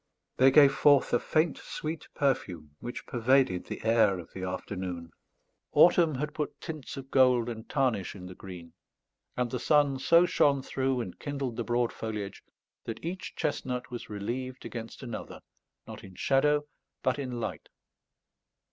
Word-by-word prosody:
They 130 +1 +7
gave 140 0 +7
forth 140 0 +4
a 120 - +5
faint 155 0 +1
sweet 155 +1 -5
perfume 90 - -1
which 120 - -6
pervaded 120 -6 +2
the - - -6
air 110 -4 +4
of 85 - -10
the 95 - -7
afternoon; 90 -2 -5 0.6
autumn 170 -3 +6
had 150 +3 -3
put 150 -1 -4
tints 155 -4 -7
of 135 0 -8
gold 125 -3 +4
and 110 -1 -7
tarnish 125 -10 0
in 90 -2 -9
the 90 - -8
green; 90 -3 -10 0.6
and 125 -1 0
the 125 - -2
sun 145 -2 +3
so 170 +5 +5
shone 140 -5 +3
through 130 -2 -1
and 95 -6 -7
kindled 140 -4 -3
the 120 - -2
broad 120 0 0
foliage, 105 -3 -5 0.4
that 115 +6 -6
each 180 +2 -5
chestnut 125 -3 -2
was 120 - -7
relieved 125 +5 -4
against 115 +2 -7
another, 120 -3 -6 0.5
not - - -9
in 95 -1 -12
shadow, 145 +6 +2 0.4
but 130 +1 +1
in 125 -3 -4
light. - - -5
125 Hz, 155 wpm, -29 LUFS, 110-140 Hz, 0.6 s, They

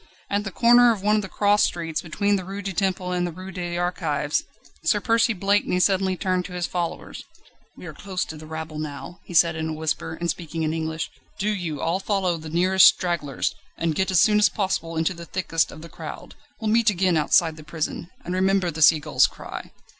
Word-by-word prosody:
At 205 +1 0
the 195 - -4
corner 240 +3 +6
of 205 -4 -3
one 210 +1 +3
of - - +1
the 195 - -7
cross 205 +1 +2
streets, 165 -2 -1
between 200 +5 0
the 190 - -2
Rue 195 +2 -6
du 195 0 -3
Temple 185 -1 -1
and 180 0 0
the - - -5
Rue 185 +3 -9
des 175 -2 -4
Archives, 155 -5 -1 0.4
Sir 205 +6 +2
Percy 230 +2 +2
Blakeney 200 -2 +1
suddenly 190 0 +2
turned 185 -2 0
to 180 - -8
his 180 -1 -2
followers: 175 -2 -4 0.5
"We - - -10
are - - -7
close 190 -2 -4
to 160 - -8
the 155 0 -11
rabble 160 -1 -6
now," 155 +3 -7
he 175 - -8
said 165 0 +5
in 160 0 -3
a - - -3
whisper, 160 +1 -3
and 170 - -2
speaking 165 -1 -3
in 155 0 0
English; 160 0 -3 0.3
"do 205 +1 0
you 175 -8 -3
all 170 +3 0
follow 190 -4 0
the 155 0 -8
nearest 185 +3 +6
stragglers, 170 -7 0 0.2
and 165 -1 0
get 190 +5 0
as 185 -3 +4
soon 210 -1 +5
as 210 - +5
possible 165 -5 -2
into 160 +3 +1
the 170 -1 -9
thickest 165 -3 0
of 155 - -11
the - - -8
crowd. 160 -2 -9 0.3
We'll 220 -1 -1
meet 230 0 +4
again 185 -3 +1
outside 160 +1 +3
the 155 - -12
prison 160 +2 -4 0.2
and 180 - -3
remember 190 -1 +2
the 160 +1 -6
sea 155 +1 +7
gull's 155 +1 +3
cry." - - -9
175 Hz, 220 wpm, -24 LUFS, 160-195 Hz, 0.5 s, sea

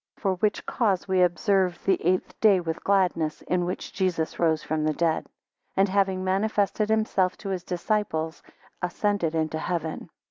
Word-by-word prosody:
10 - - -27
For 195 -2 +2
which 210 +3 0
cause 200 -7 0
we 190 -1 +2
observe 180 0 +2
the 190 -2 +2
eight 180 +2 +1
day 205 -4 +6
with 165 -2 -4
gladness, 180 -6 +1
in 180 -1 0
which 180 - -5
Jesus 175 -4 -1
rose 160 -2 +2
from 155 0 -1
the 155 0 +1
dead; 165 -2 0 0.5
and 195 +1 +5
having 190 -1 +1
manifested 205 +2 +1
himself 215 -4 +1
to 200 - -6
his 185 -2 -2
disciples, 175 -3 -2 0.4
ascended 180 -2 0
into 160 0 -1
heaven. 165 -2 -3
185 Hz, 165 wpm, -26 LUFS, 165-200 Hz, 0.5 s, day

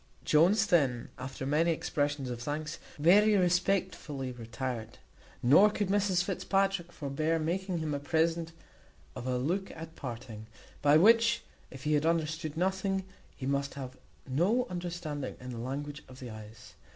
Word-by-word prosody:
Jones, 185 +8 +5
then, 135 - +2
after 130 +1 -5
many 155 +5 +2
expressions 145 -4 -1
of 120 -1 -5
thanks, 155 +5 -4 0.2
very 205 +7 +5
respectfully 180 -7 0
retired; 120 -1 -5 0.5
nor 150 +12 +7
could 205 -2 -2
Mrs 195 -2 +2
Fitzpatrick 195 -1 0
forbear 155 +2 -1
making 180 +3 -1
him 155 -2 -2
a 140 - -1
present 165 +2 0 0.6
of 125 0 -6
a 125 -1 +1
look 180 +10 -1
at 160 0 -9
parting, 115 -4 -7 0.3
by 145 +1 +6
which 230 +5 +5 0.3
if 135 -1 -11
he 150 - +1
had 150 +1 +2
understood 160 -1 -1
nothing, 190 +2 0 0.3
he 130 - -6
must 140 +1 -1
have 130 -2 -6 0.3
had 130 - -8
no 215 - +3
understanding 175 -6 -4
in 125 0 -7
the 120 - -6
language 145 +4 -5
of 130 0 -13
the 125 -3 -7
eyes. 110 -6 -11
155 Hz, 150 wpm, -31 LUFS, 135-180 Hz, 0.6 s, nor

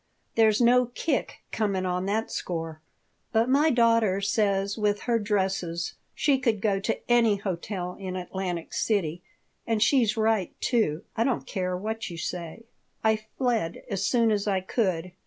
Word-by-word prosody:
"There's 220 -2 +4
no 245 +1 +5
kick 265 +3 -2
comin' 200 -4 0
on 180 +1 -1
that 220 +3 -1
score. 165 -2 -4 0.5
But 225 +2 +2
my 290 +4 +4
daughter 230 -6 +3
says 200 -1 +1
with 210 -2 0
her 235 -2 +1
dresses 190 -5 -1 0.2
she 285 -3 +2
could 230 -5 +1
go 195 -1 +1
to 195 - -1
any 235 -3 +4
hotel 185 -1 -4
in 185 -2 -5
Atlantic 180 -2 -4
City, 180 -6 0 0.5
and 225 -1 +1
she's 225 -1 +3
right, 220 -4 0
too. 215 - +1
I 230 - +2
don't 255 -1 0
care 185 -3 -2
what 220 +3 -4
you 170 - -7
say." 175 +6 -5 0.4
I 220 0 +4 0.2
fled 235 -10 0
as 195 -1 -1
soon 230 +1 +3
as 205 -1 0
I 195 -2 +2
could. 185 -3 -1
205 Hz, 155 wpm, -27 LUFS, 185-230 Hz, 0.5 s, no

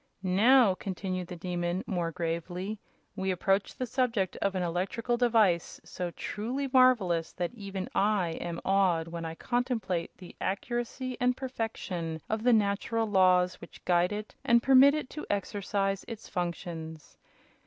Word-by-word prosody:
"Now," 210 +4 +5
continued 185 -1 -4
the 180 - -7
Demon, 175 +1 -2
more 175 -5 -2
gravely, 175 +5 -3 0.4
"we 190 0 -2
approach 195 +2 +1
the 255 - -2
subject 230 -6 0
of 195 -1 -1
an 185 - 0
electrical 190 +8 -1
device 220 -8 +2
so 180 -1 -4
truly 245 +10 -3
marvelous 220 -11 +4
that 175 +3 -3
even 195 -4 -5
I 200 -4 +2
am 170 -1 -4
awed 185 -4 +2
when 165 0 -5
I 160 0 -5
contemplate 225 -8 -2
the 180 - -12
accuracy 240 +5 -3
and 250 0 +2
perfection 210 -10 -4
of 220 0 0
the 245 +2 +4
natural 220 +1 +1
laws 185 -3 +3
which - - -13
guide 175 +1 +3
it 210 +1 -5
and 235 0 +4
permit 270 +2 +7
it 305 - -3
to 300 - -7
exercise 195 0 -1
its 225 -2 -8
functions. 165 -3 -5
195 Hz, 145 wpm, -29 LUFS, 175-230 Hz, 0.4 s, permit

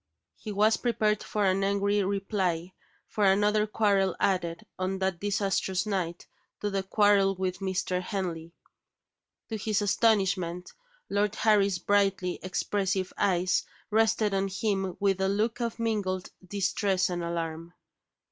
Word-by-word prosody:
He 215 - -7
was 210 +2 +3
prepared 215 -3 +1
for 210 -1 -1
an 190 +1 +2
angry 200 +1 +1
reply 190 -3 -1 0.3
for 210 - -2
another 210 +2 +3
quarrel 200 -3 +2
added, 175 -3 0
on 185 +1 -1
that 190 -2 -1
disastrous 195 -2 0
night, 180 -5 -3 0.3
to 205 - -2
the 195 0 0
quarrel 195 0 +3
with 185 -1 -2
Mr. 185 -1 -1
Henley. 175 -4 -4 1.0
To 220 - -3
his 215 0 0
astonishment, 190 -4 +1 0.3
Lord 205 +1 0
Harry's 200 -4 +3
brightly 195 -1 +1
expressive 190 0 -1
eyes 185 -2 +1 0.3
rested 220 -1 +2
on 195 0 +1
him 195 -2 -2
with 195 -2 +1
a 190 - +2
look 220 +4 0
of 235 -1 -2
mingled 205 -5 -2 0.2
distress 195 0 0
and 175 -1 -3
alarm. 170 0 -4
195 Hz, 130 wpm, -28 LUFS, 185-205 Hz, 1.0 s, was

